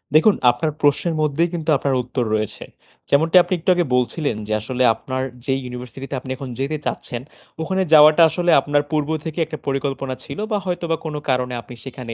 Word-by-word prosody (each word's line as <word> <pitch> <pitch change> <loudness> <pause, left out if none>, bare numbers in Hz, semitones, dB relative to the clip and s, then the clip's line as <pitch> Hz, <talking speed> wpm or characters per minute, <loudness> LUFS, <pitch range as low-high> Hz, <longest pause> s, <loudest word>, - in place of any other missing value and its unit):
দেখুন 195 +7 +6 0.2
আপনার 155 +6 -2
প্রশ্নের 150 +3 +2
মধ্যেই 155 +3 +1
কিন্তু 165 -2 -3
আপনার 135 0 0
উত্তর 125 0 -2
রয়েছে। 105 -1 -3 0.5
যেমনটা 160 +5 +4
আপনি - - -3
একটু 160 - -2
আগে 175 -1 +1
বলছিলেন 125 +1 0
যে, 110 - -1
আসলে 130 +3 -1
আপনার 130 +3 -4 0.2
যেই 135 0 0
ইউনিভার্সিটি 125 +1 -7
তে - - -1
আপনি 130 - -7
এখন 135 -2 -7
যেতে 140 +3 -1
চাচ্ছেন 120 -1 -4 0.4
ওখানে 190 +3 -1
যাওয়াটা 155 +2 +8
আসলে 175 +2 +1
আপনার 145 +1 +1
পূর্ব 150 -1 0 0.2
থেকে 160 +1 -4
একটা 155 - -7
পরিকল্পনা 135 -1 -2
ছিল, - - -8
বা 210 - +2
হয়তোবা 175 -2 -1
কোন 155 - -4
কারণে 125 -1 0
আপনি 120 +3 -12
সেখানে 125 -3 -7
140 Hz, 190 wpm, -21 LUFS, 125-160 Hz, 0.5 s, যাওয়াটা